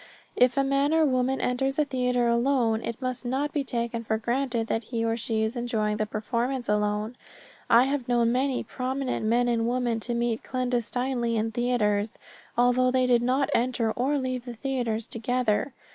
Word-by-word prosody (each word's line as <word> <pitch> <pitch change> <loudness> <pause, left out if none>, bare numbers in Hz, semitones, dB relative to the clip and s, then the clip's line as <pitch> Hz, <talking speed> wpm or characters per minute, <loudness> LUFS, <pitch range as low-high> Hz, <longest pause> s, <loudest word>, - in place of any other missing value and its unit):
If 250 0 +3
a 275 - +4
man 275 +3 +2
or 320 -1 +4
woman 260 -1 +1
enters 270 +2 0
a 300 - +3
theater 250 -3 0
alone, 235 -2 +2
it 230 0 -5
must 255 0 -3
not 270 +4 -1
be 290 - 0
taken 235 -2 -3
for 220 0 0
granted 240 0 -1
that 225 0 -2
he 230 -1 -2
or 225 0 +1
she 225 -1 -1
is 220 +3 -2
enjoying 220 -3 -1
the 215 - -1
performance 240 +4 -2
alone. 210 +2 0 0.5
I 235 +1 +7
have 270 -2 -1
known 240 -1 +2
many 260 +1 0
prominent 255 -1 -3
men 240 +2 +3
and 230 -1 +1
women 240 -2 0
to 240 +2 -2
meet 235 -1 -1
clandestinely 245 -1 -1
in 220 +1 -1
theaters, 220 -3 0 0.4
although 245 +1 +4
they 255 0 +2
did 245 -1 +3
not 260 +3 +1
enter 235 -2 +1
or 265 +6 0
leave 255 -2 -3
the 245 -2 -7
theaters 235 -3 -2
together. 235 +1 0
245 Hz, 180 wpm, -26 LUFS, 230-255 Hz, 0.5 s, I